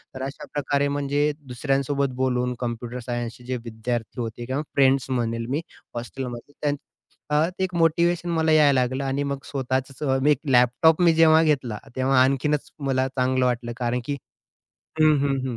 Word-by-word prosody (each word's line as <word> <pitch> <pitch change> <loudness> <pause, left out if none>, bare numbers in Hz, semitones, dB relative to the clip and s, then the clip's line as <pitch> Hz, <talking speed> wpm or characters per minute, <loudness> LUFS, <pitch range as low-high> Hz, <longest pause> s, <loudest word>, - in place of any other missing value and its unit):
तर 130 - -6
अशाप्रकारे 140 +1 -2
म्हणजे 145 +1 0 0.2
दुसऱ्यांसोबत 135 +1 -1
बोलून 125 -1 0
कॉम्प्युटर 120 0 -4
सायन्सचे 120 0 -4
जे 130 0 -2
विद्यार्थी 115 +1 -4
होते 115 +1 -5
किंवा 130 +4 -2
फ्रेंड्स 135 -1 +3
म्हणेल 115 -2 -1
मी 145 +5 0 0.3
हॉस्टेलमध्ये 120 +2 -6
त्यान 145 -1 +1 0.5
अ, 150 +2 +3
ते 190 +1 -4
एक 185 -1 -2
मोटिव्हेशन 170 +1 +2
मला 160 -1 +2
यायला 145 -4 +5
लागलं 130 +2 -1
आणि 135 +1 -1
मग 140 - -3
स्वतःचंच 130 +1 -2
अ, 130 - +3
मी 150 +3 +4
एक 140 - +2
लॅपटॉप 125 +7 +4
मी 170 -2 +5
जेव्हा 160 0 +6
घेतला, 130 -8 0 0.2
तेव्हा 130 0 +3
आणखीनच 140 +2 0 0.2
मला 130 0 +1
चांगलं 130 -1 +1
वाटलं 120 -1 -1
कारण 125 0 -1
की 140 -1 -2 0.8
हं, 155 -1 +6
हं, 140 -1 +1
हं. 120 - -4
135 Hz, 165 wpm, -24 LUFS, 125-145 Hz, 0.8 s, जेव्हा